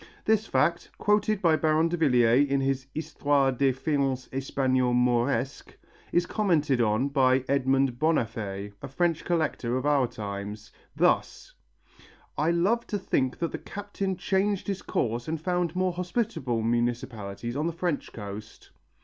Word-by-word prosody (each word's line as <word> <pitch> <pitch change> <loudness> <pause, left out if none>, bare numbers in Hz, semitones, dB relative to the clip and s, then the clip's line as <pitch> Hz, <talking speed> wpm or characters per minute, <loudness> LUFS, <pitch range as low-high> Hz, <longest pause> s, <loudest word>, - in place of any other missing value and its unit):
This 220 0 +2
fact, 170 0 +1
quoted 210 -1 +1
by 165 -2 +5
Baron 155 +1 +2
Davillier 135 -6 +3
in 140 0 +2
his 135 0 -1
Histoire 145 -3 +1
des 135 +1 +2
faïences 135 -1 -1
hispano 130 -1 0
moresques, 125 +1 0 0.4
is 175 0 +2
commented 160 - +1
on 110 +4 +2
by 130 -2 +3
Edmond 135 -2 +1
Bonnaffé, 110 -10 -1
a - - -6
French 165 +4 0
collector 155 -8 0
of 130 - -3
our 145 -4 +3
times, 105 0 -7 0.2
thus: - - +1 0.8
"I 155 +2 +1
love 190 +8 +1
to 205 - -2
think 130 -9 0
that 170 - -2
the - - -5
captain 200 -2 -4
changed 195 +1 0
his 195 -2 -3
course 120 +1 -2
and 160 0 -2
found 175 0 -1
more 185 -1 +1
hospitable 180 - -2
municipalities 120 -2 -2
on 150 +3 0
the - - 0
French 170 -2 -2
coast." 105 0 -9
140 Hz, 140 wpm, -27 LUFS, 120-170 Hz, 0.8 s, by